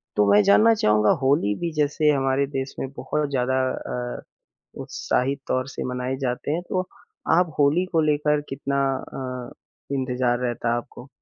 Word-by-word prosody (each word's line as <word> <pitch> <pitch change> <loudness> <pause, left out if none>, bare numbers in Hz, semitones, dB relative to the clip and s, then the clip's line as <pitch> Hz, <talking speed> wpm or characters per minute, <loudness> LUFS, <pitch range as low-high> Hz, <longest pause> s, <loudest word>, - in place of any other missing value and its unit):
तो 105 - +4
मैं 105 - +7
जानना 220 +3 +6
चाहूँगा 105 - +3
होली 130 -6 +2
भी 170 -1 -2
जैसे 150 0 +2
हमारे 135 0 +1
देश 135 -1 -4
में 135 - -3
बहुत 150 -1 -2
ज़्यादा 130 -1 0
अ, 125 0 -5 0.6
उत्साहित 135 +2 -1
तौर 130 +1 0
से - - -5
मनाए 125 +1 -2
जाते 125 +2 -2
हैं। 170 +3 -1
तो 185 - 0 0.6
आप 175 -4 +1
होली 150 +5 +3
को 165 - +3
लेकर 150 0 +2
कितना 140 0 -1 0.3
अ, 125 -2 -5 0.4
इंतज़ार 125 -2 0
रहता 120 -1 -1
है - - +2
आपको? 120 +2 -8
135 Hz, 160 wpm, -24 LUFS, 125-150 Hz, 0.6 s, मैं